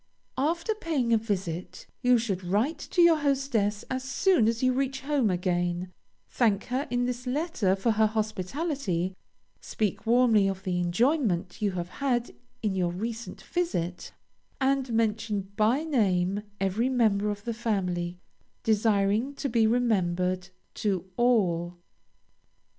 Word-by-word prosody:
After 335 +9 0
paying 300 - 0
a - - +6
visit, 185 -5 -4 0.2
you 250 -1 +5
should 200 -5 -2
write 210 - 0
to 350 - +4
your 335 -2 +6
hostess 265 -8 0
as 260 0 -3
soon 270 - +3
as 230 +2 0
you 255 0 +4
reach 270 0 -1
home 275 -5 +1
again; 175 0 -1 0.3
thank 215 -5 +1
her 270 +3 0
in 245 0 0
this 250 0 -4
letter 250 - 0
for 210 +4 +1
her 220 0 +3
hospitality, 215 - -2 0.4
speak 210 0 -3
warmly 230 -4 +4
of 190 -1 -3
the 180 -2 -1
enjoyment 190 - +1
you 205 -2 +1
have 175 -1 -4
had 245 0 -1 0.3
in 210 -3 +1
your 180 -2 0
recent 225 +5 -5
visit, 180 - -2 0.5
and 270 -1 +1
mention 215 -3 -1
by 225 +8 +2
name 200 - +1 0.2
every 195 +6 +1
member 215 -5 +2
of 205 -1 -4
the 235 - -2
family, 180 -6 -2 0.5
desiring 215 +3 +2
to 275 - -3
be 225 -2 +3
remembered 185 -6 +1 0.2
to 190 -3 -2
all. 180 -8 +2
220 Hz, 135 wpm, -27 LUFS, 190-255 Hz, 0.5 s, a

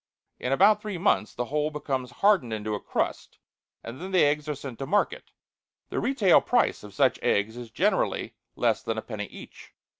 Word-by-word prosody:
In 125 - -2
about 205 +8 +5
three 210 -4 -4
months 170 - +1
the 125 - -2
whole 150 +4 -1
becomes 135 -4 -3
hardened 185 - +2
into 110 0 -3
a 105 - -2
crust, - - -3 0.5
and 120 +6 -8
then 185 - -5
the 185 -2 +4
eggs 150 +1 0
are 150 - -1
sent 135 -4 -8
to 135 - -4
market; 340 - 0 0.6
the - - -2
retail 225 -9 +4
price 245 -1 +1
of 105 -2 -12
such - - +3
eggs 105 +3 +1
is 120 -2 -8
generally 110 - 0 0.2
less - - +1
than - - -3
a - - -3
penny - - -5
each. - - -13
145 Hz, 190 wpm, -27 LUFS, 120-190 Hz, 0.6 s, about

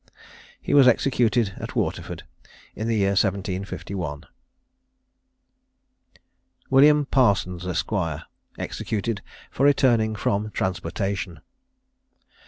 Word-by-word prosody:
He - - -3
was 140 -3 +7
executed 120 -4 +2
at - - -7
Waterford - - -3 0.5
in 110 - -3
the 115 - +1
year 100 -2 +2
1751. 95 -5 -2 2.5
WILLIAM 145 +2 +6
PARSONS, 95 -8 +2
ESQ. 90 +4 -2 0.6
EXECUTED 105 -1 -3 0.3
FOR 135 - +1
RETURNING 120 -6 +3
FROM 105 +1 -1
TRANSPORTATION. 95 -1 -3
105 Hz, 80 wpm, -24 LUFS, 95-120 Hz, 2.5 s, was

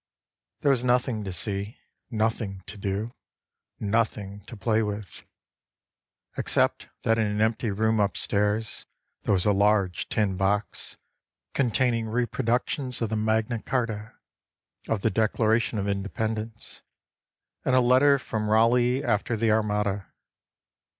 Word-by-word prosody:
There 140 - +4
was 125 -3 +1
nothing 125 -3 +1
to 95 - -3
see, 100 +4 -2 0.3
Nothing 110 -4 -1
to 100 - -8
do, 100 +3 -3 0.7
Nothing 105 -2 -1
to 115 - -9
play 110 +2 +1
with, 105 -2 -5 1.1
Except - - +1
that 115 0 +2
in 110 - +2
an 105 0 -2
empty 110 +1 +1
room 110 +2 +1
upstairs 105 +1 0 0.3
There - - -1
was 90 - 0
a 105 - +5
large 100 -2 +2
tin 100 -4 0
box 100 +2 -1 0.6
Containing 120 -3 +1
reproductions 125 +2 -1
of 110 - -1
the 110 - -1
Magna 110 +1 0
Charta, 115 -3 -2 0.7
Of 110 -3 0
the 115 - +2
Declaration 110 +1 +1
of 100 0 -1
Independence 110 +3 -3 0.8
And 130 - +2
of 130 - +5
a - - +1
letter 140 +3 +6
from 110 -5 -3
Raleigh 120 +4 +3
after 110 0 0
the 110 0 +2
Armada. 105 -2 0
110 Hz, 130 wpm, -26 LUFS, 105-115 Hz, 1.1 s, letter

